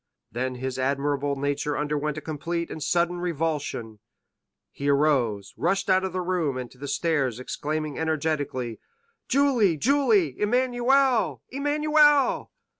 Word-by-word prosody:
Then 130 +2 -2
his 130 +1 -4
admirable 140 +1 0
nature 145 +1 -1
underwent 150 0 -2
a - - -4
complete 170 +2 -4
and 160 - -6
sudden 175 +3 +1
revulsion; 150 -10 -3 0.7
he 140 +1 -3
arose, 130 -9 +1
rushed 195 +3 +1
out 185 0 +4
of 190 - -2
the 185 +1 -2
room 175 -7 -1
and 125 -1 -6
to 125 - -19
the 145 - -6
stairs, 140 -5 0
exclaiming 150 +3 -3
energetically, 145 -7 -2 0.5
"Julie, 250 - +3
Julie—Emmanuel, 245 - +2
Emmanuel!" 295 +1 +3
155 Hz, 120 wpm, -25 LUFS, 140-195 Hz, 0.7 s, out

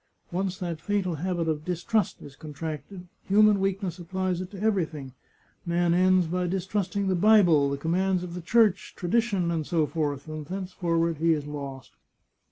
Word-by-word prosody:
Once 185 +1 -2
that 170 -3 -4
fatal 195 -1 -1
habit 175 0 -2
of 155 -1 -1
distrust 180 +4 -1
is 140 - -11
contracted, 155 +4 -7 0.2
human 210 0 +5
weakness 195 -2 -2
applies 185 +1 -2
it 185 - -6
to 195 -2 -10
everything. 165 - -1 0.5
Man 170 0 +1
ends 185 0 +4
by 180 +2 -1
distrusting 195 +1 -1
the 190 - +2
Bible, 175 -7 +5
the 140 - -2
commands 180 +4 0
of 175 -1 -6
the 180 - -5
Church, 205 0 +2
tradition, 190 -2 0
etc., 155 -2 0
and 155 -1 -6
thenceforward 175 -3 -1
he 165 +2 +3
is 150 -2 -3
lost. 140 -3 -7
175 Hz, 155 wpm, -27 LUFS, 160-190 Hz, 0.5 s, human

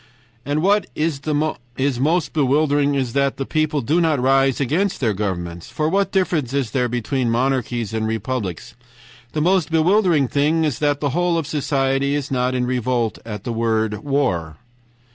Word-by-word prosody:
"AND 150 +2 0
WHAT 200 0 +3
IS 145 -4 -2
MOST 155 +5 +1
BEWILDERING 145 0 +2
IS 130 -4 -1
THAT 140 -1 +1
THE 135 - -3
PEOPLE 155 -1 0
DO 155 +8 +1
NOT 160 -4 +2
RISE 135 0 +3
AGAINST 170 +9 0
THEIR 115 -5 +1
GOVERNMENTS. 85 -4 -4
FOR 155 0 -1
WHAT 195 +3 +1
DIFFERENCE 165 -9 0
IS 130 -6 -1
THERE 125 -1 0
BETWEEN 125 +1 -1
MONARCHIES 120 -2 -1
AND 110 0 -1
REPUBLICS? 110 -4 -3 0.6
THE 155 - -1
MOST 180 -1 +2
BEWILDERING 165 -2 +3
THING 150 +5 +1
IS 145 -7 -1
THAT 145 -1 +1
THE 145 - +1
WHOLE 175 +2 +1
OF 165 - -1
SOCIETY 140 -1 0
IS 145 -1 -3
NOT 125 0 0
IN 125 -1 0
REVOLT 125 -2 -1
AT 105 -3 -6
THE 120 - -3
WORD 110 -2 0
WAR." 105 - -1
135 Hz, 165 wpm, -21 LUFS, 120-155 Hz, 0.6 s, WHAT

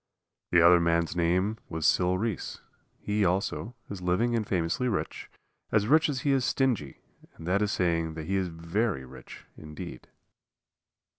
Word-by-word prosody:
The 85 -1 +5
other 90 0 +7
man's 85 0 +1
name 90 +5 +1
was 80 -2 -3
Sil 90 0 +3
Reese. 110 -1 -3 0.4
He, 105 0 -1
also, 100 +6 -1
is 100 -2 -7
living 90 +7 +1
and 110 -3 -1
famously 90 +7 0
rich 110 - -3 0.4
as 105 -2 +3
rich 155 +6 +4
as 130 -3 -2
he 140 - +1
is 135 -2 +2
stingy, 120 - 0 0.3
and 80 - -11
that 95 +4 +1
is 105 0 +1
saying 85 -4 0
that 80 -1 -6
he 95 +4 -1
is 95 -1 0
very 85 - -2
rich 65 0 -12
indeed. 75 -1 -9
90 Hz, 160 wpm, -28 LUFS, 85-110 Hz, 0.4 s, other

